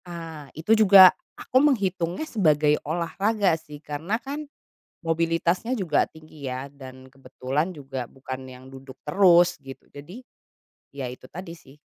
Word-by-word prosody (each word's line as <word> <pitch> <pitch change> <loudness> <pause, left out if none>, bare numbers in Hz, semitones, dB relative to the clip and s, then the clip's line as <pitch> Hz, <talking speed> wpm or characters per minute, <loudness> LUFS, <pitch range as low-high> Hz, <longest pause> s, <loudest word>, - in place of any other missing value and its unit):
Ah, 165 -4 -9
itu 165 +8 +2
juga 195 -4 +8 0.2
aku 260 - +1
menghitungnya 195 - 0
sebagai 155 - +2
olahraga, 190 +5 0
sih, 160 -2 -7
karena, 155 +8 -4
kan, 285 +5 -6 0.6
mobilitasnya 170 +8 0
juga 175 -8 +1
tinggi, 155 -3 -10
ya, 130 +1 -5
dan 130 -2 -12
kebetulan 135 +4 -4
juga 135 -7 -7
bukan 130 0 -8
yang 130 0 -13
duduk 135 0 -12
terus 175 +1 +5
gitu 135 -1 -12
jadi, 180 - -11 0.7
ya, 135 -3 -5
itu 125 - -12
tadi, 180 +1 -9
sih, 135 -3 -18
160 Hz, 135 wpm, -24 LUFS, 135-190 Hz, 0.7 s, juga